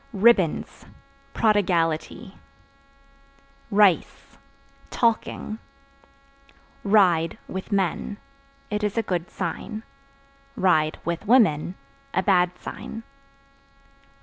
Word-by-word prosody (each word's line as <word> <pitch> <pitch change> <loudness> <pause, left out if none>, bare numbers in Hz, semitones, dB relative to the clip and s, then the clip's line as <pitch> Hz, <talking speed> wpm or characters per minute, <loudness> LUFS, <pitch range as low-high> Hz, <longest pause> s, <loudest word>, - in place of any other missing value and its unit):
Ribbons 200 -5 +2 0.5
Prodigality. 175 -7 +1 1.4
Rice 205 -4 +2 0.5
Talking. 225 -1 -1 1.2
Ride 185 -6 +3
(With 190 +3 -6
men) 195 +1 -1 0.5
it 210 0 -2
is 210 +1 -1
a 230 - +2
good 175 -4 -2
sign; 220 0 -5 0.7
(with 170 0 +1
women) 190 - +3 0.4
a - - +2
bad 180 -2 +2
sign. 225 +3 -8
195 Hz, 70 wpm, -24 LUFS, 175-215 Hz, 1.4 s, Ride